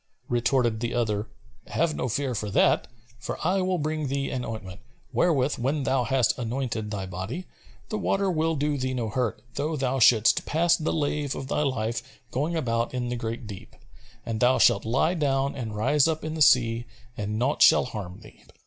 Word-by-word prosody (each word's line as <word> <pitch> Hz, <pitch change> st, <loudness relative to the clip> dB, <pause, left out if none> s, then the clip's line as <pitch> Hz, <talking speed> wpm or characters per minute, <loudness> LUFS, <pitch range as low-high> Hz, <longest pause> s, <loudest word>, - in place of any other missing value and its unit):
Retorted 120 Hz, -2 st, +1 dB
the 120 Hz, +1 st, -2 dB
other, 110 Hz, -3 st, 0 dB, 0.4 s
"Have 165 Hz, -1 st, 0 dB
no 125 Hz, -, -2 dB
fear 130 Hz, +3 st, -1 dB
for 105 Hz, -2 st, -3 dB
that, -, -, +3 dB, 0.3 s
for 125 Hz, -, -5 dB
I 190 Hz, +3 st, +2 dB
will 185 Hz, 0 st, 0 dB
bring 155 Hz, -1 st, -2 dB
thee 140 Hz, +1 st, -2 dB
an 130 Hz, -3 st, -3 dB
ointment, 105 Hz, -4 st, -7 dB, 0.3 s
wherewith 145 Hz, -5 st, +2 dB
when 135 Hz, +4 st, 0 dB
thou 130 Hz, -2 st, +1 dB
hast 130 Hz, -2 st, +1 dB
anointed 115 Hz, -2 st, -3 dB
thy 100 Hz, -2 st, -4 dB
body, 95 Hz, -, -5 dB, 0.4 s
the 215 Hz, -, -2 dB
water 195 Hz, -1 st, +1 dB
will 160 Hz, -1 st, 0 dB
do 145 Hz, 0 st, -1 dB
thee 130 Hz, 0 st, -2 dB
no 115 Hz, -3 st, -2 dB
hurt, 120 Hz, 0 st, -2 dB
though 150 Hz, +4 st, -2 dB
thou 135 Hz, -1 st, -1 dB
shouldst 110 Hz, -2 st, +5 dB
pass 170 Hz, +2 st, +3 dB
the 160 Hz, -, -2 dB
lave 145 Hz, -2 st, -1 dB
of 135 Hz, -, -6 dB
thy -, -, 0 dB
life 115 Hz, -5 st, -1 dB, 0.3 s
going 150 Hz, +6 st, -1 dB
about 115 Hz, -5 st, -1 dB
in 125 Hz, -1 st, -2 dB
the 125 Hz, -, -2 dB
great 115 Hz, 0 st, -4 dB
deep: 105 Hz, 0 st, -10 dB, 0.5 s
and 115 Hz, -1 st, -3 dB
thou 125 Hz, +2 st, +4 dB
shalt 120 Hz, -, +4 dB
lie 135 Hz, +9 st, +2 dB
down 140 Hz, -4 st, 0 dB
and 115 Hz, -6 st, -5 dB
rise 130 Hz, +7 st, +3 dB
up 160 Hz, -1 st, -1 dB
in 155 Hz, -, -3 dB
the 160 Hz, -, -4 dB
sea 120 Hz, -4 st, +4 dB, 0.3 s
and 105 Hz, -2 st, -3 dB
naught 130 Hz, +6 st, 0 dB
shall -, -, +7 dB
harm 100 Hz, -7 st, -7 dB
thee." -, -, -16 dB
130 Hz, 195 wpm, -26 LUFS, 115-150 Hz, 0.5 s, shall